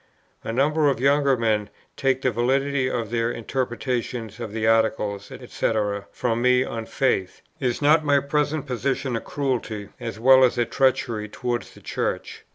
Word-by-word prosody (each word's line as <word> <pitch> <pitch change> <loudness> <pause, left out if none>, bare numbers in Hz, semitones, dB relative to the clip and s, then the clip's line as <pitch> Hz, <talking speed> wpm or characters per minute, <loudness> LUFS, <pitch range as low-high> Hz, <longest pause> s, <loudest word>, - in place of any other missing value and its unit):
A - - -3
number 145 +5 +2
of 130 -4 -1
younger 140 0 +3
men 110 -3 0 0.3
take 135 -1 0
the 130 - +2
validity 130 +3 +1
of 115 -4 -3
their 115 0 0
interpretation 120 -1 -3
of 115 -3 -5
the 110 0 -2
Articles, 110 -3 +1
&c. - - -3 0.4
from 120 -1 -1
me 125 0 +4
on 115 -3 -5
faith. 100 -9 -1 0.2
Is 130 0 -1
not 155 +2 +5
my 145 -1 +4
present 150 +1 -1
position 130 0 -2
a 115 - -2
cruelty, 115 -7 -3
as 110 - -6
well 130 +2 +7
as 125 - +3
a 120 - +2
treachery 115 -4 0
towards 120 +2 -4
the - - -15
Church? - - -3
125 Hz, 165 wpm, -24 LUFS, 115-135 Hz, 0.4 s, well